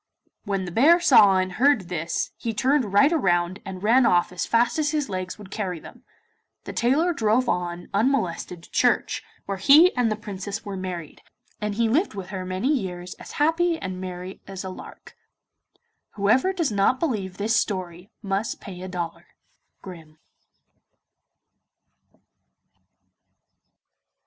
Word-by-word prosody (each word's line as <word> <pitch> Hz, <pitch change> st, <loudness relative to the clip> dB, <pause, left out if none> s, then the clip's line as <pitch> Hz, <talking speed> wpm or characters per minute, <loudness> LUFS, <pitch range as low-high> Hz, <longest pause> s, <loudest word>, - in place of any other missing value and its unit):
When 195 Hz, -2 st, -2 dB
the 175 Hz, -, -6 dB
bear 305 Hz, -, +5 dB
saw 210 Hz, -, +6 dB
and 185 Hz, 0 st, 0 dB
heard 265 Hz, +4 st, +3 dB
this 170 Hz, -2 st, -3 dB
he 225 Hz, -2 st, -4 dB
turned 260 Hz, -2 st, +1 dB
right 275 Hz, +10 st, +5 dB
round 185 Hz, -, +1 dB
and 190 Hz, 0 st, -8 dB
ran 240 Hz, +5 st, +5 dB
off 175 Hz, -6 st, +3 dB
as 180 Hz, -, -3 dB
fast 240 Hz, +6 st, +2 dB
as 300 Hz, -1 st, +1 dB
his 295 Hz, -5 st, -1 dB
legs 185 Hz, -1 st, -4 dB
would 205 Hz, -2 st, -13 dB
carry 185 Hz, -6 st, -3 dB
him. -, -, -14 dB, 0.6 s
The -, -, -7 dB
tailor 295 Hz, +9 st, +2 dB
drove 235 Hz, -1 st, +1 dB
on 175 Hz, -2 st, -2 dB
unmolested 195 Hz, -7 st, -1 dB
to -, -, -17 dB
church, -, -, +1 dB, 0.2 s
where 195 Hz, -1 st, -4 dB
he 305 Hz, -, +6 dB
and 245 Hz, -3 st, +1 dB
the -, -, 0 dB
Princess 205 Hz, 0 st, -6 dB
were 200 Hz, -1 st, -5 dB
married, 180 Hz, -4 st, -6 dB, 0.4 s
and 210 Hz, -1 st, -2 dB
he 230 Hz, +1 st, +2 dB
lived 280 Hz, -, +1 dB
with 190 Hz, -2 st, -7 dB
her 190 Hz, -2 st, -5 dB
many 185 Hz, +8 st, -1 dB
years 180 Hz, -7 st, -4 dB
as -, -, -10 dB
happy 330 Hz, +3 st, +2 dB
and 185 Hz, -5 st, -6 dB
merry 185 Hz, 0 st, -7 dB
as 195 Hz, -1 st, -7 dB
a 190 Hz, -, -5 dB
lark. 185 Hz, -, -12 dB, 1.0 s
Whoever 225 Hz, -, +2 dB
does 335 Hz, -9 st, -1 dB
not 205 Hz, +5 st, +2 dB
believe 200 Hz, -, -2 dB
this 220 Hz, +3 st, 0 dB
story 185 Hz, -4 st, -2 dB
must 200 Hz, +2 st, -2 dB
pay 180 Hz, -2 st, -9 dB
a 185 Hz, -, -6 dB
dollar. 175 Hz, -2 st, -5 dB, 0.6 s
Grimm. 165 Hz, -5 st, -11 dB
200 Hz, 150 wpm, -24 LUFS, 185-250 Hz, 1.0 s, saw